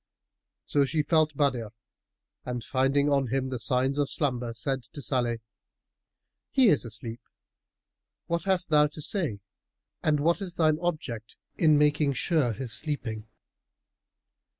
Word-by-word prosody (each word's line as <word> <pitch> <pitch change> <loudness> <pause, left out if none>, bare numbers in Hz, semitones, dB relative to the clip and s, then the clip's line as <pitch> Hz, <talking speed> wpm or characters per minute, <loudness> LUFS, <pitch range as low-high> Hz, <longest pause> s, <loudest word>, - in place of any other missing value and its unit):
So 145 - +2
she 150 +3 0
felt 155 -2 +2
Badr 130 -6 +1 0.8
and 125 -2 -4
finding 135 +3 +2
on 140 -2 +2
him 130 +2 -1
the 130 -2 -3
signs 130 +4 +1
of 145 -1 +1
slumber 125 -5 0
said 130 +4 -2
to - - -7
Salih, 120 -4 0 1.1
"He 260 -5 +5
is 150 - +3
asleep; 115 0 -6 1.0
what 170 +2 -2
hast 190 -2 +1
thou 150 -1 +5
to 150 +1 -9
say 150 - -2 0.6
and 150 -1 +2
what 170 +6 +2
is 185 -3 -4
thine 155 -2 +3
object 150 -10 -4 0.2
in 155 -3 +4
making 145 -1 +3
sure 150 -4 +1
his 120 +1 -6
sleeping?" 110 -5 -4
140 Hz, 135 wpm, -28 LUFS, 125-155 Hz, 1.1 s, He